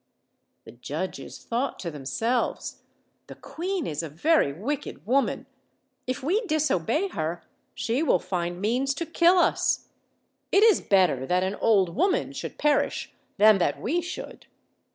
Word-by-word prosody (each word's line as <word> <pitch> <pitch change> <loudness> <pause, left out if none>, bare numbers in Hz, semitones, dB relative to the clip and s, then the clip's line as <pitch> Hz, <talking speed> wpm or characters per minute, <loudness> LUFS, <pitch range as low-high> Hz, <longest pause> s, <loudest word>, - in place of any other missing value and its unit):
The - - -12
judges 150 +9 -6
thought 245 +4 -2
to 170 - -4
themselves, 225 - -2 0.5
'The - - -10
queen 365 0 -4
is 150 0 -3
a 165 - -6
very 170 - +2
wicked 230 - -5
woman; 265 +5 +1 0.6
if 255 0 -3
we 385 - +1
disobey 310 - +1
her 165 - -4 0.3
she 235 +5 -1
will 320 - +3
find 175 -1 -3
means 250 +7 0
to 335 - -3
kill 340 +3 +4
us. - - +1 0.6
It 400 - +5
is 445 -3 +5
better 180 -10 +2
that 180 +1 +2
an 190 +1 -1
old 195 -5 +2
woman 370 - +1
should - - -6
perish 295 -1 0 0.2
than 215 -1 +6
that 145 -5 0
we 335 +8 0
should." 350 +2 -8
230 Hz, 145 wpm, -26 LUFS, -, 0.6 s, than